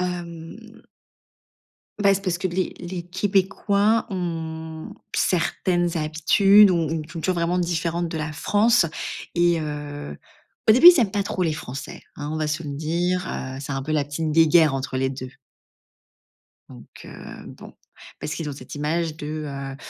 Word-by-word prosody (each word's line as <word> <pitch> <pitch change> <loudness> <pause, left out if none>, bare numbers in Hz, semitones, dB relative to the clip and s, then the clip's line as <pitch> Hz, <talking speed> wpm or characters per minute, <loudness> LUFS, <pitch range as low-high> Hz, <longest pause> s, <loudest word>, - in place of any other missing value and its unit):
Hem 180 +5 -6 1.2
beh, 200 0 +6
c'est 195 - -4
parce 175 -2 -1
que 185 - -1
les 185 +2 -2
les 175 0 -5
québécois 200 +3 +1
ont 160 -3 -5 0.2
certaines 175 0 0
habitudes 190 +6 +5
ou - - +2
ont 165 -2 0
une 155 -1 -3
culture 170 +3 -2
vraiment 170 +1 0
différente 170 0 -1
de 160 -1 -4
la 155 0 -3
France 210 +6 +3 0.5
et 175 -1 +3
heu, 145 - -6 0.5
au - - +9
début, 255 +10 +9
ils 350 -4 +8
aiment 215 -5 +2
pas 205 0 0
trop 185 -1 -3
les 165 - +1
Français, 140 -3 -7 0.2
hein. 145 0 -5
On - - -2
va 155 - -1
se 155 +2 -2
le 145 - -5
dire, 170 +5 -1
heu, 130 0 -5
c'est 140 0 -5
un 135 0 -3
peu 155 +3 -3
la 150 - +2
petite 155 +2 -3
guéguerre 160 -2 +5
entre 135 -1 -3
les 130 0 0
2. 130 -1 -7 1.4
Donc - - -13 0.2
heu, - - -10 0.4
bon, - - -12 0.5
parce 150 - -4
qu'ils 160 -3 -4
ont - - -4
cette 140 - -10
image 155 +2 -1
de, 150 - -7 0.2
heu, 140 -1 -6
165 Hz, 170 wpm, -23 LUFS, 150-180 Hz, 1.4 s, au